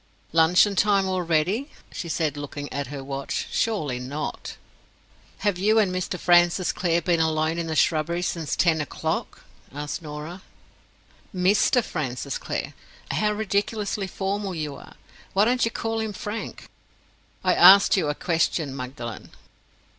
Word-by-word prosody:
"Luncheon 175 +5 +5
time 200 -1 +3
already!" 185 - 0 0.2
she 170 - -6
said, 155 -3 -1
looking 145 0 -6
at 140 0 -3
her 140 0 -7
watch. 135 0 -3
"Surely 155 - -1
not?" 140 +4 -5 0.9
"Have 200 -4 +1
you 215 +3 +3
and 200 -4 +3
Mr. 185 0 -2
Francis 175 +1 +4
Clare 170 -1 0
been 175 -3 +2
alone 160 +1 +1
in 165 - -3
the 160 - -2
shrubbery 165 +3 +1
since 165 -4 -2
ten 165 -3 +2
o'clock?" 145 - -4 0.3
asked 145 +5 -5
Norah. 155 +4 -7 0.9
"Mr. 200 +6 +3
Francis 135 - -4
Clare! - - -4 0.4
How 210 0 +1
ridiculously 205 -1 -1
formal 195 0 -3
you 150 -3 -4
are. - - -13 0.4
Why 200 +2 +4
don't 250 +1 +2
you - - 0
call 225 0 -3
him 220 -1 -3
Frank?" 210 +3 -6 0.8
"I 185 -1 +3
asked 195 +4 +8
you 180 -6 +1
a 145 - -1
question, 160 -4 0
Magdalen." 125 -3 -7
175 Hz, 140 wpm, -25 LUFS, 150-200 Hz, 0.9 s, asked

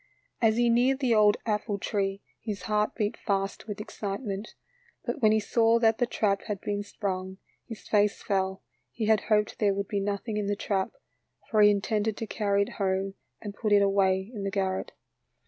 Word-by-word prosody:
As 225 -1 +4
he 240 0 +3
neared 245 +3 +3
the 255 -4 +1
old 210 -1 +5
apple 210 -1 -1
tree 195 -1 -2 0.2
his 210 -4 -5
heart 210 0 0
beat 210 -2 -1
fast 195 +1 -2
with 210 -1 -5
excitement. 205 -1 -5 0.5
But - - -3
when 215 -2 +5
he 220 - +4
saw 225 +2 +3
that 225 -1 +3
the 245 - +2
trap 200 -4 0
had 205 -2 -3
been 205 +1 -2
sprung, 190 -2 -4 0.3
his 225 -4 -9
face 210 -1 +2
fell, 190 -1 -1 0.3
he 225 - -3
had 215 -1 +3
hoped 210 -1 +1
there 200 -2 +2
would 200 0 -2
be 205 - 0
nothing 205 +2 -2
in 205 -1 -1
the 205 - 0
trap, 195 -2 -1 0.6
for 215 -2 +4
he 210 - +8
intended 210 +1 0
to 225 - -3
carry 200 -2 +1
it - - -6
home 195 0 0 0.3
and 205 -2 -5
put 215 +1 -2
it 205 -1 +6
away 195 0 +2
in 205 -3 -5
the 195 - -1
garret. 190 -1 -2
205 Hz, 195 wpm, -28 LUFS, 195-220 Hz, 0.6 s, he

